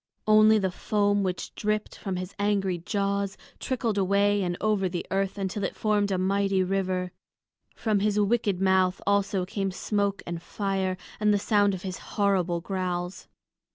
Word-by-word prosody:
Only 215 Hz, 0 st, +6 dB
the 190 Hz, -3 st, 0 dB
foam 205 Hz, +2 st, +1 dB
which 185 Hz, -2 st, -3 dB
dripped 215 Hz, 0 st, -2 dB
from 195 Hz, -3 st, -4 dB
his 185 Hz, +1 st, -5 dB
angry 195 Hz, -3 st, +1 dB
jaws 200 Hz, +2 st, -1 dB, 0.2 s
trickled 235 Hz, -6 st, -1 dB
away 200 Hz, +1 st, +3 dB
and 175 Hz, -1 st, -1 dB
over 210 Hz, -3 st, +1 dB
the 175 Hz, -1 st, -4 dB
earth 195 Hz, +1 st, 0 dB
until 195 Hz, +1 st, -3 dB
it 190 Hz, -, -2 dB
formed 210 Hz, -2 st, +1 dB
a 190 Hz, -, +1 dB
mighty 195 Hz, 0 st, +1 dB
river; 185 Hz, -1 st, -1 dB, 0.6 s
from 215 Hz, -3 st, +1 dB
his 210 Hz, +1 st, +1 dB
wicked 205 Hz, -2 st, +1 dB
mouth 190 Hz, -1 st, +3 dB
also 200 Hz, -1 st, +1 dB
came 195 Hz, +1 st, -2 dB
smoke 200 Hz, +1 st, -1 dB
and 170 Hz, -1 st, -5 dB
fire, 190 Hz, -1 st, -2 dB, 0.2 s
and 210 Hz, 0 st, +3 dB
the 205 Hz, -, +4 dB
sound 205 Hz, -1 st, +2 dB
of 185 Hz, -, -9 dB
his 185 Hz, -1 st, -5 dB, 0.2 s
horrible 185 Hz, -4 st, +2 dB
growls. 180 Hz, -1 st, -3 dB
195 Hz, 160 wpm, -27 LUFS, 185-205 Hz, 0.6 s, Only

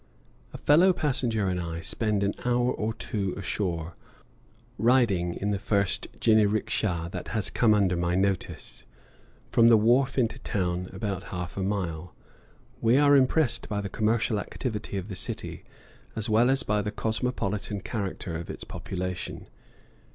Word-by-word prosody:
A -, -, -8 dB
fellow 175 Hz, +6 st, +5 dB
passenger 125 Hz, -, 0 dB
and 90 Hz, -1 st, -1 dB
I 85 Hz, -1 st, -4 dB
spend 105 Hz, +4 st, 0 dB
an 100 Hz, -, +1 dB
hour 125 Hz, 0 st, +2 dB
or 110 Hz, +1 st, -2 dB
two 100 Hz, -4 st, -3 dB
ashore, 90 Hz, -5 st, -3 dB, 0.8 s
riding 110 Hz, -7 st, +3 dB
in 100 Hz, +1 st, -2 dB
the 100 Hz, -, -1 dB
first 100 Hz, -1 st, 0 dB
jiniriksha 105 Hz, -5 st, +2 dB
that -, -, -6 dB
has 110 Hz, -3 st, -1 dB
come 110 Hz, -3 st, +4 dB
under 95 Hz, -3 st, +2 dB
my 85 Hz, +1 st, 0 dB
notice, 95 Hz, 0 st, -2 dB, 0.7 s
from 115 Hz, -, +5 dB
the 115 Hz, -1 st, +7 dB
wharf 125 Hz, +6 st, +3 dB
into 115 Hz, -4 st, +1 dB
town, 90 Hz, -2 st, -2 dB
about 95 Hz, -1 st, -4 dB
half 90 Hz, -1 st, -5 dB
a 100 Hz, -, -3 dB
mile. 90 Hz, -6 st, -3 dB, 0.7 s
We 115 Hz, +3 st, +4 dB
are 145 Hz, 0 st, +6 dB
impressed 135 Hz, +1 st, +2 dB
by 105 Hz, -1 st, -1 dB
the 100 Hz, -1 st, -4 dB
commercial 110 Hz, +1 st, +1 dB
activity 105 Hz, -2 st, -4 dB
of 95 Hz, 0 st, -4 dB
the 100 Hz, -, -6 dB
city; -, -, -5 dB, 0.5 s
as 110 Hz, 0 st, -2 dB
well 115 Hz, +3 st, +4 dB
as 135 Hz, 0 st, +2 dB
by 105 Hz, 0 st, +1 dB
the 105 Hz, -, -3 dB
cosmopolitan 105 Hz, -3 st, -2 dB
character 95 Hz, -5 st, -4 dB
of 85 Hz, +1 st, -6 dB
its -, -, -6 dB
population. 90 Hz, -1 st, -5 dB
105 Hz, 150 wpm, -27 LUFS, 95-115 Hz, 0.8 s, the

